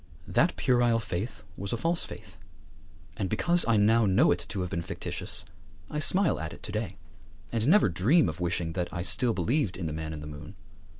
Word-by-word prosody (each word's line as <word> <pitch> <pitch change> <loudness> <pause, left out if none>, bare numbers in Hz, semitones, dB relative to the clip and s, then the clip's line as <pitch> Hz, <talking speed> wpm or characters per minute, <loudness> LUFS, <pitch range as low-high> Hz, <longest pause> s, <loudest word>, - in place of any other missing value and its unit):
That - - +2
puerile 120 -2 +2
faith 105 +1 -5
was 100 +1 -5
a - - 0
false 165 +8 +1
faith; 100 -6 -11 0.8
and 95 -3 -2
because 175 - +2
I 115 -2 +4
now 110 +2 +4
know 95 - +4
it - - -2
to 95 - -3
have 90 -2 -4
been 85 - -2
fictitious 80 -1 -1 0.5
I 150 - -2
smile 185 +3 +3
at 80 0 -5
it - - -13
to - - -5
day, 105 -3 -4 0.5
and 115 +1 0
never 200 - +5
dream 110 - +3
of 80 +2 -4
wishing 85 -1 -1
that 90 -1 -3
I 85 -1 -4
still 120 +4 +3
believed 100 - 0
in 90 - -4
the 80 - -3
Man 80 0 -5
in 75 -1 -6
the - - -8
Moon. 75 0 -9
100 Hz, 205 wpm, -28 LUFS, 85-120 Hz, 0.8 s, never